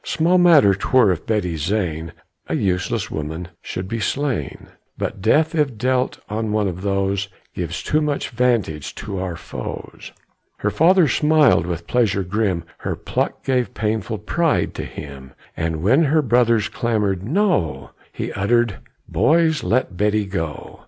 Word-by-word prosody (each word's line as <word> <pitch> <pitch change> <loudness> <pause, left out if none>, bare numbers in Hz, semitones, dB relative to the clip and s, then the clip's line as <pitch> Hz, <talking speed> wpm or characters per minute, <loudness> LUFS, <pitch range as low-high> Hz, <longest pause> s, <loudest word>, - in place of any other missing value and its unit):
Small 175 +3 +2
matter 155 - +6
'twere 105 +2 +3
if 85 - -4
Betty 105 -6 0
Zane, 85 -2 -2 0.4
A - - 0
useless 95 -1 -1
woman, 80 +3 -5
should 90 +1 -5
be 115 +3 -3
slain; 140 +3 -2 0.3
But 100 - -4
death, 155 +10 +3
if 145 -7 0
dealt 130 +2 0
on 110 +1 -2
one 105 -1 +1
of 90 -1 -5
those, 100 0 0 0.3
Gives 90 -1 -4
too 155 - +1
much 150 -2 -1
vantage 115 - 0
to 95 - -5
our 90 -2 -3
foes." - - -8 0.5
Her 105 - -1
father 170 - +5
smiled 150 - +4
with 85 -1 -4
pleasure 105 -6 +1
grim 95 -2 -1 0.2
Her - - -3
pluck - - -3
gave 125 -2 0
painful 110 +1 -1
pride 165 - 0
to - - -5
him; 70 -3 -9 0.2
And 80 -1 -2
while 130 - +4
her 150 +2 +3
brothers 115 -3 +3
clamored 105 -6 -1
"No!" 105 - 0 0.2
He - - -5
uttered, 115 +1 +1 0.3
"Boys, 160 0 +2
let 95 -1 0
Betty 105 +1 +1
go! 80 -7 -5
105 Hz, 150 wpm, -21 LUFS, 90-130 Hz, 0.5 s, matter